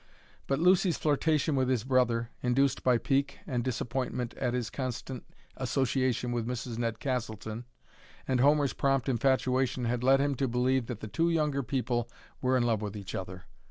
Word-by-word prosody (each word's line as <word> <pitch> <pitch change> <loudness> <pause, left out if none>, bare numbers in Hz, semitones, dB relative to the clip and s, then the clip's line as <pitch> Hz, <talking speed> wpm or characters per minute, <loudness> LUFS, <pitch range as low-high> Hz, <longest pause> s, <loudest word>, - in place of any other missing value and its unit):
But 135 - +1
Lucy's 180 +2 +4
flirtation 155 0 +1
with 130 -1 +1
his 125 -5 +1
brother, 120 -3 +1
induced 135 +2 +1
by 125 -2 +4
pique 140 +3 0
and 125 -4 -1
disappointment 125 0 -2
at 125 -2 -1
his 120 -2 -2
constant 130 -1 -4 0.3
association 130 -1 0
with 120 -1 -2
Mrs. 120 -1 -4
Ned 115 -2 -1
Castleton, 115 -3 -3 0.6
and 130 -2 +1
Homer's 145 +1 +4
prompt 135 -2 +1
infatuation 130 0 +1
had 120 +1 -1
led 135 +1 +5
him 140 0 +1
to 135 - +1
believe 125 0 +1
that 120 -4 -6
the 110 - -5
two 165 - +1
younger 150 -4 +1
people 120 -2 -1 0.3
were 130 0 +2
in 125 - +2
love 115 -3 +1
with 105 0 -4
each 100 -2 -7
other. 95 -1 -6
125 Hz, 170 wpm, -30 LUFS, 120-135 Hz, 0.6 s, led